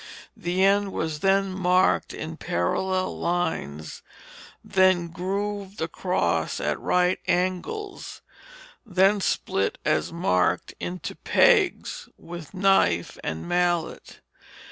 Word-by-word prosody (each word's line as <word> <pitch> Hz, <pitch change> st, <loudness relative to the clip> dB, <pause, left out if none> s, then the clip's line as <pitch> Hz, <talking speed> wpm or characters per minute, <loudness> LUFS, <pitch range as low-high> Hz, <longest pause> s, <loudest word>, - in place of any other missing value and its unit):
The 180 Hz, +2 st, -1 dB
end 200 Hz, 0 st, +2 dB
was 160 Hz, -2 st, -2 dB
then 195 Hz, +2 st, +2 dB
marked 185 Hz, 0 st, +2 dB
in -, -, -6 dB
parallel 185 Hz, -, -1 dB
lines, 160 Hz, -, -2 dB, 0.6 s
then 185 Hz, -2 st, +3 dB
grooved 200 Hz, +3 st, -4 dB
across 175 Hz, +3 st, -1 dB
at -, -, -1 dB
right 180 Hz, 0 st, +2 dB
angles, 185 Hz, -, -2 dB, 0.6 s
then 195 Hz, -1 st, +3 dB
split 95 Hz, -, 0 dB
as 155 Hz, +1 st, +1 dB
marked 90 Hz, -, 0 dB
into 180 Hz, +1 st, -5 dB
pegs 485 Hz, +1 st, +2 dB
with 170 Hz, -2 st, -9 dB
knife 185 Hz, -, +2 dB
and 80 Hz, -, -4 dB
mallet. 175 Hz, -2 st, -1 dB
180 Hz, 100 wpm, -25 LUFS, 170-195 Hz, 0.6 s, then